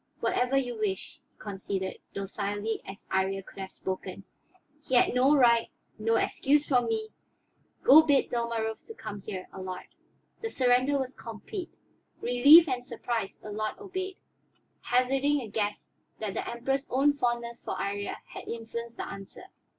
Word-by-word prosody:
"Whatever 250 +2 +1
you 245 -4 -1
wish," 195 -3 -3
he - - -42
conceded, 195 -2 -4 0.2
docilely 205 +2 -2
as 195 +1 -9
Iría 190 0 0
could - - -13
have 190 0 -5
spoken. 190 0 -5 0.6
"He 260 - -1
had 245 - +5
no 260 +4 +5
right, 235 -4 +5 0.3
no 225 +1 +2
excuse 290 +5 +2
from 245 -4 +3
me. 220 -1 -1 0.7
Go 300 +4 +10
bid 285 -4 +2
Dalmorov 230 -2 -1 0.2
come 205 -2 -6
here, 185 -1 -6
Allard." 185 -1 -6 0.6
The 450 - -2
surrender 255 - +3
was 265 -1 -3
complete. 235 - -7 0.5
Relieved 285 +8 +8
and 250 -3 -1
surprised, 235 -4 -4
Allard 215 +1 -3
obeyed, 375 -1 -5 0.6
hazarding 270 +4 +2
a 235 - -6
guess 205 0 -2 0.3
that 215 -3 -3
the - - -3
Emperor's 270 +4 -1
own 275 +3 +4
fondness 240 -3 -2
for - - -3
Iría 200 0 -2
had - - -10
influenced 235 0 -6
the - - -4
answer. 195 - -9
235 Hz, 145 wpm, -29 LUFS, 205-265 Hz, 0.7 s, Go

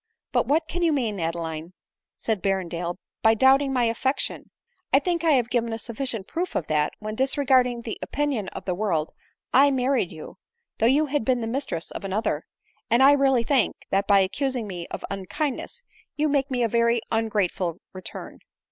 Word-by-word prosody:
" - - -67
But - - +2
what 315 +3 +2
can 350 +2 -3
you 335 -2 +3
mean, 230 -9 -1
Adeline," 165 0 -3 0.4
said 220 -4 -1
Berrendale, 175 -3 -1 0.3
"by 220 0 +5
doubting 270 +4 +4
my 250 -2 +2
affection? 235 +4 -1 0.4
I - - +6
think 345 -3 0
I 310 -5 +5
gave 240 0 0
a 230 -1 -3
sufficient 235 -2 -4
proof 350 +2 -3
of 165 - 0
that, 150 -1 +1
when, 215 0 -5
disregarding 260 -1 +2
the 225 - -5
opinion 280 -9 -1
of - - -8
the 185 - 0
world, 175 -5 -1 0.4
I 280 +2 +7
married 260 -6 +1
you, 160 -2 -10 0.4
though 225 - +4
you 285 +5 +4
had 290 -3 -1
been 250 +1 +1
the - - -2
mistress 230 - -3
of - - -7
another; 200 +3 -1 0.4
and 240 +3 +4
I 275 - +8
really 270 -4 +3
think, 250 -5 +2 0.2
that 195 +1 +1
by 200 -1 +6
accusing 250 +5 -1
me 180 -4 -6
of - - -6
unkindness, 275 - -3 0.3
you 305 +1 +1
make 280 -1 +1
me 250 -2 0
a - - +3
very 235 +1 +2
ungrateful 205 -6 0 0.2
return." 185 -2 -8
235 Hz, 185 wpm, -25 LUFS, 195-275 Hz, 0.4 s, I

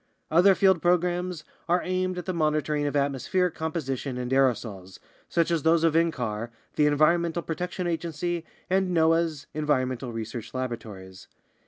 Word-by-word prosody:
Other 180 +4 +6
field 190 -4 +4
programs 175 -1 +1 0.3
are 175 +1 +2
aimed 185 0 -1
at 180 - -5
the 185 - -2
monitoring 150 -2 0
of 145 - -3
atmospheric 145 +6 +1
com 160 0 -3
position 135 -4 -3
and 125 0 -4
aerosols, 110 -8 0 0.3
such 170 0 +1
as 165 -2 +1
those 160 +2 +3
of 165 -2 +3
ncar, 120 -9 0 0.3
the 150 - +4
Environmental 170 +3 +2
Pro 160 - -3
tection 180 +1 -4
Agency, 170 0 -2 0.2
and 185 -1 +1
noaa's 160 -2 +2
Environmental 130 -4 -1
Research 115 +1 -6
Laboratories. 105 -7 -6
155 Hz, 150 wpm, -26 LUFS, 130-175 Hz, 0.3 s, Other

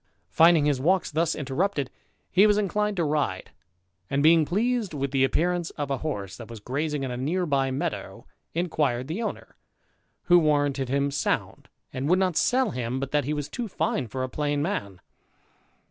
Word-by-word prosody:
Finding 165 -2 +5
his 140 -3 +1
walks 185 +4 +2
thus 160 +1 +1
interrupted, 145 +1 -1 0.4
he 195 +4 +6
was 210 -1 +3
inclined 210 0 0
to 170 - +2
ride, 145 -11 -1 0.6
and, 140 +1 +1
being 160 0 +6
pleased 215 +1 0
with 140 -1 -2
the 135 -1 +2
appearance 175 +5 +1
of 145 -2 -3
a 135 - -1
horse 100 -12 -4
that 115 - -9
was 115 -2 -8
grazing 145 +6 -2
in 130 - -3
a 125 - -4
neighbouring 140 -2 0
meadow, - - -4 0.3
inquired 150 -7 0
the 170 +9 -3
owner; 225 - -5 0.7
who 175 0 +6
warranted 145 -4 +1
him 140 +1 +1
sound, 140 - -2 0.2
and 135 +3 -2
would 180 - +5
not 185 -3 +1
sell 250 +2 +2
him 125 -1 -3
but 135 0 -4
that 145 -3 +1
he 150 - -1
was 145 -1 -3
too 235 +9 -4
fine 140 - -1
for 130 +4 -4
a - - -1
plain 145 +2 -1
man. 145 - -3
150 Hz, 180 wpm, -26 LUFS, 135-175 Hz, 0.7 s, he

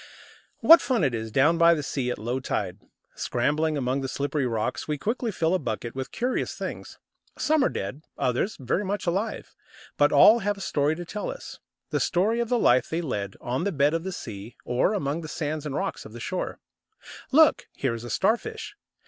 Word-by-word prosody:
What 330 +1 +9
fun 245 - +1
it 135 -4 +2
is 110 -1 -4
down 150 +8 +3
by 170 0 +6
the 150 - -3
sea 130 -3 -2
at - - -2
low 120 +5 -2
tide! 100 -6 -3 0.3
Scrambling 150 +5 0
among 130 0 -1
the 135 - -2
slippery 140 0 -1
rocks, 115 -2 -2
we 150 -1 -1
quickly 230 - -2
fill 165 -2 0
a 185 - +2
bucket 115 - -4
with 130 0 -5
curious 250 +2 -1
things. - - -6 0.4
Some 310 -2 +2
are - - +3
dead, 100 +10 -5 0.2
others 125 - 0
very 135 +10 -1
much 200 +1 -3
alive; 195 +6 -2 0.4
but - - +4
all 225 +3 +7
have 205 -1 -1
a - - -10
story 150 -4 0
to 175 +1 -7
tell 210 +4 -4
us - - -8 0.3
the - - +1
story 210 +7 +1
of 235 -1 -1
the 245 - +2
life 130 - +3
they 165 +2 -1
lead 100 - -3
on 125 +6 -2
the 200 - 0
bed 145 -1 +2
of 165 0 -1
the 190 - -4
sea, 110 - -8
or 125 - +1
among 150 -3 -2
the 160 - -7
sands 150 0 -3
and 140 - -4
rocks 195 +4 -3
of 110 - -12
the 120 - -8
shore. 180 +10 -3 0.7
Look, 310 +3 +5
here 135 -4 -1
is 115 0 -6
a 120 - -7
Starfish! 235 - -1
150 Hz, 210 wpm, -26 LUFS, 125-195 Hz, 0.7 s, What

